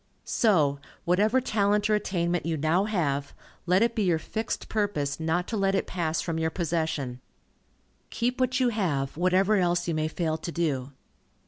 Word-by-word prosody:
So, 155 -11 +2 0.3
whatever 210 +8 +3
talent 210 -3 +1
or 215 - +2
attainment 175 -4 0
you 165 -1 -1
now 160 +6 +2
have, 145 -9 -1 0.3
let 185 +4 +4
it 235 0 +1
be 225 - -1
your 180 -5 +2
fixed 220 +7 -4
purpose 180 -11 -1
not 165 +3 0
to 225 - -2
let 195 -1 +2
it - - 0
pass 165 -3 -1
from 165 -2 -2
your 160 0 +1
possession. 160 -7 -2 0.9
Keep 245 +2 -1
what 255 0 +1
you 255 -1 +3
have, 160 - -1
whatever 185 +5 +3
else 175 -1 +1
you 170 - 0
may 155 0 0
fail 160 0 -1
to 170 - -5
do. 145 -6 -1
175 Hz, 175 wpm, -27 LUFS, 160-205 Hz, 0.9 s, let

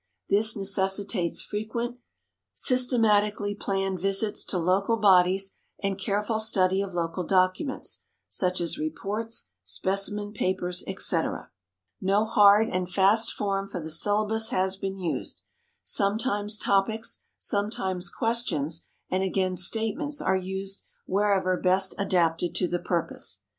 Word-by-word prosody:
This 215 +2 +4
necessitates 195 -2 +1
frequent, 235 +4 -4 0.6
systematically 215 -5 +2
planned 195 -2 -2
visits 195 +3 0
to 185 - -3
local 190 +6 +1
bodies 190 -1 +4 0.3
and 195 -1 0
careful 205 +3 -1
study 190 -3 +3
of 195 -2 -5
local 170 +1 -2
documents, 185 - 0 0.3
such 180 -1 -1
as 170 - -1
reports, 200 - -4
specimen 195 - -2
papers, 185 -3 0
etc. 190 -3 0 0.5
No 200 +3 +2
hard 210 0 +5
and 185 -2 -3
fast 200 +5 +3
form 195 -1 -2
for 180 - -6
the 160 -1 -4
syllabus 215 +6 +2
has 190 -4 0
been 195 0 -5
used. 180 -3 -4 0.4
Sometimes 210 0 +1
topics, 220 +4 +1 0.2
sometimes 190 -3 -1
questions, 170 - -2 0.2
and 185 - +1
again 190 -1 0
statements 225 - +1
are 190 - +1
used 190 +1 -3 0.2
wherever 190 -2 +1
best 190 +1 +3
adapted 175 -3 +1
to 180 0 +1
the 175 0 -2
purpose. 170 -1 -2
195 Hz, 120 wpm, -26 LUFS, 185-210 Hz, 0.6 s, hard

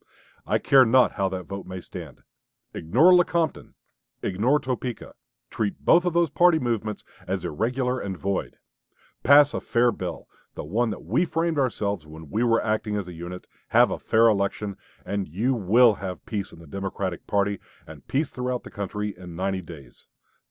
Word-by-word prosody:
I - - +2
care 135 -1 +5
not 125 +2 +4
how 95 -1 -1
that 95 -1 -5
vote 100 +2 -7
may 95 0 -6
stand.... - - -10 0.5
Ignore 130 - +4
Lecompton; 170 -2 +1 0.5
ignore 115 +10 +2
Topeka; 125 -3 -4 0.4
treat 105 -2 -3
both 175 +1 +5
those 170 -3 +2
party 175 -2 +5
movements 115 -6 -2 0.2
as - - -2
irregular 125 - -1
and 95 -2 -5
void; 100 0 -3 0.6
pass 145 +1 +6
a - - -3
fair 120 +1 +2
bill - - -6 0.3
the - - -5
one 110 +10 0
that 105 - -6
we 110 - +1
framed 165 -2 -1
ourselves 100 - -1
when 80 -1 -12
we 110 +4 +1
were 115 -1 +2
acting 110 -1 -1
as 100 -3 -3
a 90 - -8
unit; 85 +2 -8 0.2
have - - +4
a - - -3
fair 115 +1 +4
election 100 -1 0 0.3
and 100 -2 -2
you 110 - 0
will 115 +2 +5
have 95 -2 -6
peace 100 -4 -4
in - - -14
the 85 - -13
Democratic 95 +1 -4
party, 100 -1 0 0.3
and 75 -3 -13
peace 140 +2 -1
throughout 125 0 -3
the - - -11
country, 105 +1 -4
in 90 -2 -10
ninety 95 +1 -2
days. 75 -7 -13
105 Hz, 175 wpm, -25 LUFS, 95-125 Hz, 0.6 s, pass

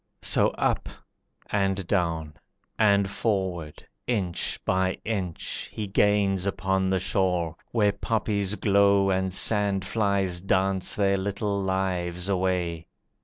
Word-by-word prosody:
So - - +4
up, - - 0 0.6
and 95 -2 0
down, 85 -5 -1 0.5
and 100 -2 +4
forward, 95 -7 -2 0.2
inch 100 -8 -1
by 95 0 +1
inch, 95 -6 -3
He 110 - -4
gains 100 -1 +2
upon 95 0 0
the 95 - +2
shore, 90 -3 0 0.2
where 105 -3 +3
poppies 105 -1 -1
glow 100 -1 +3
And 95 0 0
sandflies 100 -2 +1
dance 95 0 +1
their 100 -1 +2
little 100 +1 -2
lives 95 -1 -1
away. 90 -3 -1
95 Hz, 110 wpm, -26 LUFS, 90-100 Hz, 0.6 s, So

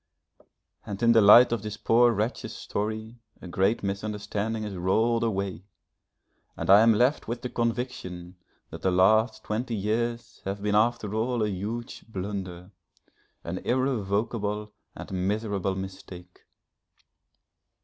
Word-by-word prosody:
And 100 +2 -6
in 115 - +6
the 115 -1 +6
light 115 +5 +8
of 120 -3 -1
this 105 -1 -6
poor 120 +2 +4
wretch's 110 +2 -3
story, 110 +3 -4 0.2
a - - -10
great 95 +6 +1
misunderstanding 105 +2 -3
is 105 -1 -5
rolled 110 +6 +1
away, 100 -4 -2 0.9
and - - +1
I 100 +2 +9
am 115 -1 +5
left 125 +7 +2
with 120 +1 -4
the 125 - -3
conviction 115 -7 -3 0.4
that - - -8
the 95 - +2
last 110 +5 +3
twenty 115 +2 -2
years 115 +3 -2
have 100 +1 -4
been 105 0 0
after 110 -1 +1
all 115 +1 0
a 105 - 0
huge 105 +5 -5
blunder, 95 -3 -6 0.7
an 90 +2 -4
irrevocable 105 -4 -1 0.2
and - - -9 0.2
miserable 100 -2 -1
mistake. 95 -2 -9
105 Hz, 130 wpm, -27 LUFS, 100-115 Hz, 0.9 s, I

